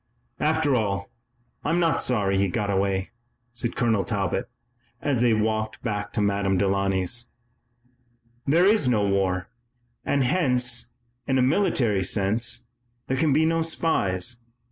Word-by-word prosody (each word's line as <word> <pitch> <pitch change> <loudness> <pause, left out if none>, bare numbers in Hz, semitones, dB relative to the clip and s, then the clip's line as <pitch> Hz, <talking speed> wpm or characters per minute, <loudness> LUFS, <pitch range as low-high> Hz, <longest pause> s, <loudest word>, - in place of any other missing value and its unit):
"After 155 -2 +2
all, 100 -5 -1 0.5
I'm 165 +4 +1
not 165 -1 +2
sorry 100 -6 +1
he 100 - +2
got 100 +2 -1
away," 95 0 0 0.4
said 120 -1 -3
Colonel 110 -4 +1
Talbot, 100 -5 -2 0.5
as 135 -5 0
they 120 -1 +4
walked 110 0 -1
back 105 -3 -3
to 105 - 0
Madame 100 -1 +1
Delaunay's. 100 +3 0 1.2
"There 165 +6 +4
is 205 -8 +4
no 105 -5 +2
war, 95 -2 0 0.5
and 140 -1 +1
hence, 125 -6 +1 0.4
in 135 - +2
a 130 - +3
military 130 - +2
sense, 110 +6 +1 0.4
there 130 - -2
can 150 +2 +2
be 155 +3 +3
no 165 0 +1
spies. 120 - 0
115 Hz, 135 wpm, -25 LUFS, 100-135 Hz, 1.2 s, they